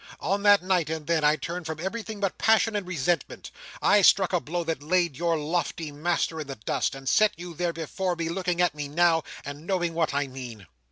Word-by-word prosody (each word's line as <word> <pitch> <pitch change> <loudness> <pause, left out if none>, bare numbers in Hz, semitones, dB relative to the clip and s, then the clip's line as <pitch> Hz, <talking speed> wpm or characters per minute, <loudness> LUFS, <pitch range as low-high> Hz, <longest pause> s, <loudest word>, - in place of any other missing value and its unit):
On 200 +3 -1
that 205 -2 +5
night, 180 -4 +1
and 160 -1 -4
then, 165 -1 +1
I 150 +1 +5
turned 170 +4 -5
from 160 -1 -5
everything 215 +4 -5
but 195 -2 -2
passion 225 0 +3
and 200 -3 -2
resentment. 170 -2 -2 0.3
I 205 0 +5
struck 190 0 +5
a 180 - +3
blow 170 +2 -3
that 165 -2 -3
laid 170 -1 +1
your 170 +2 0
lofty 160 0 -2
master 160 +1 -1
in 150 - -7
the 135 - -6
dust, 110 +4 -2
and 135 0 -10
set 215 +9 +4
you 175 0 -8
there, 175 +1 -1
before 175 +3 -3
me, 165 -1 -3
looking 180 0 -1
at 175 - +2
me 145 -1 -5
now, 165 +2 +3 0.2
and 145 +3 -8
knowing 175 -3 0
what 165 -1 0
I 145 +1 0
mean." 125 -6 -9
170 Hz, 220 wpm, -26 LUFS, 150-185 Hz, 0.3 s, that